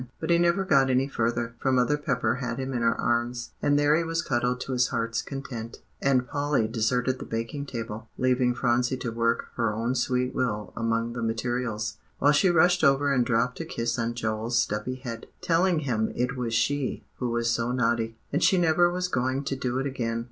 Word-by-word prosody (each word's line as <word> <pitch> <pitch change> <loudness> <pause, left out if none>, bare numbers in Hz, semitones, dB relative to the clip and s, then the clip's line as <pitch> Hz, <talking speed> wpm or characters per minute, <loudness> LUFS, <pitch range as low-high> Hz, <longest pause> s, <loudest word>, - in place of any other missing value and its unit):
But 160 +1 -2
he 170 - +5
never 175 +3 +2
got 135 -7 +4
any 130 +1 +2
further, 115 -2 -1
for 135 - +1
Mother 125 +2 +3
Pepper 125 -5 0
had 120 -3 -3
him 135 0 -3
in 120 - -1
her 115 0 +2
arms, 120 +1 -1
and 145 0 +3
there 145 +1 +4
he 170 - +1
was 165 0 -1
cuddled 125 -1 0
to - - -4
his 125 -1 +2
heart's 115 0 -1
content. 125 -5 -7 0.2
And 130 -2 +2
Polly 145 -5 0
deserted 125 +3 0
the - - -6
baking 115 +6 -4
table, 115 -3 -6
leaving 125 -1 +2
Phronsie 125 +1 +1
to 125 -2 -4
work 115 0 0
her 115 -3 +1
own 115 +3 -1
sweet 125 0 0
will 105 -5 -2
among 115 +1 -1
the 120 - -4
materials, 115 -1 -2 0.2
while 145 - +4
she 150 +6 +4
rushed 175 +1 +4
over 140 0 +4
and 125 -2 +3
dropped 120 +1 0
a 165 - -3
kiss 115 -6 -2
on 115 0 -1
Joel's 110 +1 -1
stubby 115 +2 0
head, 120 -3 -7
telling 170 -1 +2
him 115 -6 0
it 125 +2 -1
was 120 -3 -2
she 145 +3 0
who 125 - -2
was 115 0 0
so 115 +1 0
naughty, 115 -2 0 0.2
and 150 - +1
she 190 - +5
never 175 0 +4
was 180 +1 -1
going 130 -3 -1
to 135 - -2
do 125 -1 -2
it 135 - -1
again. 115 -4 -2
125 Hz, 205 wpm, -27 LUFS, 115-140 Hz, 0.2 s, he